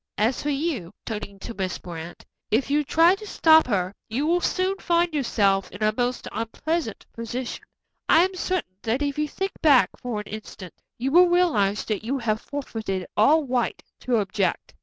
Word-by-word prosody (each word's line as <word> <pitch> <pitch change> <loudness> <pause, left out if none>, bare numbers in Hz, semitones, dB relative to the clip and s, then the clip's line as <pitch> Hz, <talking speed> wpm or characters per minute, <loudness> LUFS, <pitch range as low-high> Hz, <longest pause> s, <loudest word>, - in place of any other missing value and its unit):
As 225 +4 +1
for 295 - -2
you," 275 - -2
turning 210 -3 -5
to 235 - -6
Miss 190 -3 -3
Brant, 170 -1 -9 0.2
"if 255 +5 +1
you 295 +1 +3
try 330 +5 +5
to 420 +2 -7
stop 320 -5 +5
her, 190 -5 0 0.2
you 255 +7 -1
will 345 +3 +2
soon 375 +2 0
find 345 -1 +1
yourself 200 -9 +1
in 200 +3 -6
a 215 0 +3
most 245 +1 -1
unpleasant 230 +5 -3
position. 235 +2 -5 0.5
I 325 - +7
am 380 - -4
certain 365 - -3
that 240 +5 0
if 285 0 -2
you 300 - +1
think 385 +6 -3
back 285 -6 +5
for 240 -4 -3
an - - -12
instant 210 -4 -9 0.2
you 260 +3 -1
will 355 +3 +7
realize 300 - +2
that 215 -2 -2
you 260 +5 -1
have 220 -4 -1
forfeited 220 -9 -4
all 295 +8 +4
right 250 -2 -1 0.2
to 250 - 0
object." 195 -2 -1
245 Hz, 180 wpm, -24 LUFS, 210-315 Hz, 0.5 s, I